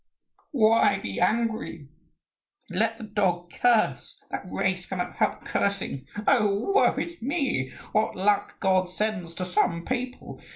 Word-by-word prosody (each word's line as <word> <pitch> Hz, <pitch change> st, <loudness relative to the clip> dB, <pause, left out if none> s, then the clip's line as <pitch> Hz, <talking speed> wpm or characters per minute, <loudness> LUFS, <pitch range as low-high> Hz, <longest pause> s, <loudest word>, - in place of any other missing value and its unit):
"Why 220 Hz, -5 st, +4 dB
be 100 Hz, -, -5 dB
angry? 220 Hz, -10 st, 0 dB, 0.8 s
Let 225 Hz, +5 st, +1 dB
the -, -, -9 dB
dog 185 Hz, -5 st, 0 dB
curse. 235 Hz, -3 st, +1 dB
That -, -, -5 dB
race -, -, -1 dB
cannot -, -, -4 dB
help -, -, 0 dB
cursing. 195 Hz, -9 st, -1 dB, 0.2 s
Oh, 215 Hz, -, +3 dB
woe 415 Hz, -, +4 dB
is 340 Hz, -4 st, -4 dB
me, 260 Hz, -, -1 dB, 0.2 s
what 215 Hz, -, +1 dB
luck 200 Hz, +2 st, +1 dB
God 185 Hz, -1 st, +2 dB
sends 180 Hz, -3 st, -3 dB
to 180 Hz, -, -3 dB
some 175 Hz, -1 st, +1 dB
people! 255 Hz, 0 st, -4 dB
210 Hz, 130 wpm, -26 LUFS, 180-230 Hz, 0.8 s, Why